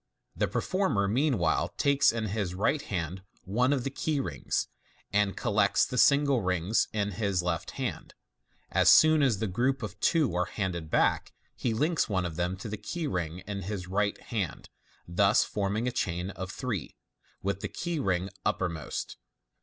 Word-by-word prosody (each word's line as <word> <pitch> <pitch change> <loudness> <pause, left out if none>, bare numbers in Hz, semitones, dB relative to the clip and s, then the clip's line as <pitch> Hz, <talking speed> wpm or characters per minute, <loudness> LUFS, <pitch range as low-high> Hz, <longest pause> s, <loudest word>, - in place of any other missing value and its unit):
The - - +1
performer 185 - 0
mean 130 +5 +2
while 85 -3 +1
takes 140 0 +4
in 115 -1 -2
his 100 -3 -2
right 115 +10 +1
hand 90 - -4 0.2
one 125 +7 +1
of 135 -4 +1
the 135 - -3
keyrings, 145 -1 -1 0.5
and 100 -1 +2
collects 105 -4 +2
the 125 -2 -2
single 140 -2 +4
rings 90 +3 +1
in 105 -2 -1
his 100 -2 0
left. 85 -2 -2 1.0
As - - +4
soon 155 -1 +7
as 130 -7 +3
the 110 - -1
group 125 +7 0
of 105 - -6
two 155 - +2
are 90 0 +1
handed 90 -5 -3
back, - - +1 0.2
he 115 -3 -1
links 155 +5 +1
one 95 -3 0
of 80 -2 -4
them 90 +2 -1
to 95 - -7
the 105 0 -4
key 160 - -4
ring 90 - -3
in 100 -1 -4
his 95 0 -4
right 100 +2 0
hand, 100 -8 -4 0.4
thus 100 +4 +4
forming 105 +3 -1
a - - 0
chain 90 -3 -2
of 95 0 -6
three, 105 - -4 0.5
with 100 0 -1
the - - -4
key 170 -2 -3
ring 95 -6 0
uppermost. 85 -5 -2
100 Hz, 170 wpm, -29 LUFS, 90-125 Hz, 1.0 s, soon